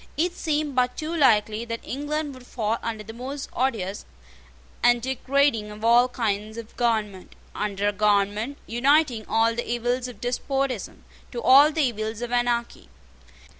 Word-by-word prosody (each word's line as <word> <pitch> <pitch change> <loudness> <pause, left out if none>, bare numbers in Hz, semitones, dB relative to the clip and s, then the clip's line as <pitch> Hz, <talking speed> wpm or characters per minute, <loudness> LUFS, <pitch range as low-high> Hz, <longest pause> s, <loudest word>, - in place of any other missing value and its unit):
It 345 +3 +1
seemed 300 -3 -1
but 250 0 +1
too 315 +2 -3
likely 220 -6 +3
that 230 -1 -5
England 295 +2 -3
would 255 -1 -14
fall 225 -1 -2
under 220 -2 -4
the 225 +2 -9
most 270 +4 -6
odious 215 -7 -1 0.8
and 240 0 +4
degrading 260 -2 +1
of 210 +1 -7
all 240 +2 +5
kinds 215 -2 -2
of 230 -1 -9
government, 215 -6 -1 0.2
under 205 -1 -2
a - - -3
government 210 +5 +1
uniting 255 -1 +2
all 225 +1 +2
the 240 +1 -4
evils 245 +1 -1
of 250 - -10
despotism 255 -1 -2 0.3
to 245 - -4
all 280 +4 +7
the 315 0 +1
evils 220 -2 -2
of 240 - -5
anarchy. 240 -1 -1
240 Hz, 155 wpm, -25 LUFS, 220-270 Hz, 0.8 s, all